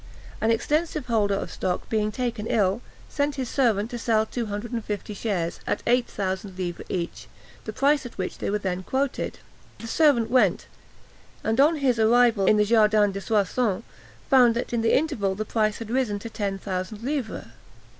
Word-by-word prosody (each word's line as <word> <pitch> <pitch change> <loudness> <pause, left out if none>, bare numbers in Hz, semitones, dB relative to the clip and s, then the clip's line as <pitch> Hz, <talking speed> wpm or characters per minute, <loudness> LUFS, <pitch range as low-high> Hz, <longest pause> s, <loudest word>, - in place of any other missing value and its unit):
An 220 - +2
extensive 300 +5 0
holder 215 -4 +1
of - - -4
stock, 180 -1 -2
being 215 -1 0
taken 235 -2 -3
ill, 205 0 +1 0.3
sent 285 -1 -1
his 260 -3 -3
servant 225 -5 +1
to 240 - -4
sell 220 -2 +2
two 235 0 -4
hundred 210 +3 -5
and 230 -2 -3
fifty 210 0 -4
shares, 190 -5 -2
at - - -1
eight 245 0 +3
thousand 190 -1 -4
livres 175 -2 -4
each, 175 -2 -4 0.4
the 215 - -4
price 280 +5 +2
at 245 - -10
which 185 - -4
they - - -2
were 210 - +1
then 185 -3 -3
quoted. 265 +7 -2 0.4
The - - -9
servant 235 -3 +3
went, 210 -8 +3 0.8
and, 225 +4 +2
on 310 +4 +5
his 260 -6 +1
arrival 225 -3 +4
in 215 - +5
the 210 - +4
Jardin 210 -2 +4
de 195 0 -5
Soissons, 215 +1 0 0.4
found 250 -4 +5
that 240 - -3
in 235 - +1
the 225 - +4
interval 240 -11 -1
the 215 +2 -3
price 215 -1 0
had 225 -1 -7
risen 245 -5 0
to 225 +3 -8
ten 200 -3 -2
thousand 195 +3 -5
livres. 270 -4 -3
220 Hz, 185 wpm, -25 LUFS, 205-245 Hz, 0.8 s, on